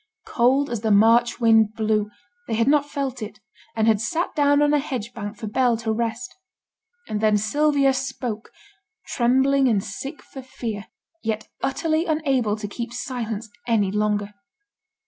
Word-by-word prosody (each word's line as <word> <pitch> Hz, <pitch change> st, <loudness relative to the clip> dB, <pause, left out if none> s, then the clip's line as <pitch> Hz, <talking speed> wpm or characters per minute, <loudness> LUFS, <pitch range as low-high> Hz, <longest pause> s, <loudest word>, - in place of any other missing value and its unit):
Cold 265 Hz, +4 st, +2 dB
as 235 Hz, -3 st, -2 dB
the 220 Hz, -, 0 dB
March 230 Hz, +4 st, +4 dB
wind 225 Hz, -2 st, +4 dB
blew, 215 Hz, -1 st, 0 dB, 0.4 s
they -, -, -1 dB
had 230 Hz, +2 st, +1 dB
not 290 Hz, 0 st, +3 dB
felt 270 Hz, -4 st, -3 dB
it, 210 Hz, -1 st, -7 dB, 0.4 s
and 220 Hz, -1 st, +1 dB
had 215 Hz, -2 st, +3 dB
sate 320 Hz, +11 st, -1 dB
down 285 Hz, -1 st, +4 dB
on 295 Hz, 0 st, +3 dB
a 295 Hz, -, +4 dB
hedge 245 Hz, -5 st, -5 dB
bank 205 Hz, -1 st, -6 dB
for 220 Hz, -, -6 dB
Bell 240 Hz, +2 st, +2 dB
to 225 Hz, -1 st, -2 dB
rest. 225 Hz, +1 st, -3 dB, 0.7 s
And 210 Hz, -1 st, -3 dB
then 215 Hz, -1 st, +4 dB
Sylvia 280 Hz, +5 st, +2 dB
spoke, 250 Hz, -4 st, -4 dB, 0.5 s
trembling 265 Hz, +3 st, +2 dB
and 210 Hz, -5 st, +2 dB
sick 270 Hz, +10 st, -7 dB
for 270 Hz, -, -10 dB
fear, 225 Hz, -5 st, -6 dB, 0.3 s
yet 220 Hz, -1 st, -3 dB
utterly 315 Hz, +5 st, 0 dB
unable 270 Hz, -9 st, +1 dB
to 210 Hz, -1 st, -6 dB
keep 235 Hz, +3 st, -6 dB
silence 235 Hz, -3 st, -4 dB, 0.2 s
any 210 Hz, -5 st, +2 dB
longer. 210 Hz, 0 st, -1 dB
235 Hz, 160 wpm, -23 LUFS, 215-270 Hz, 0.7 s, March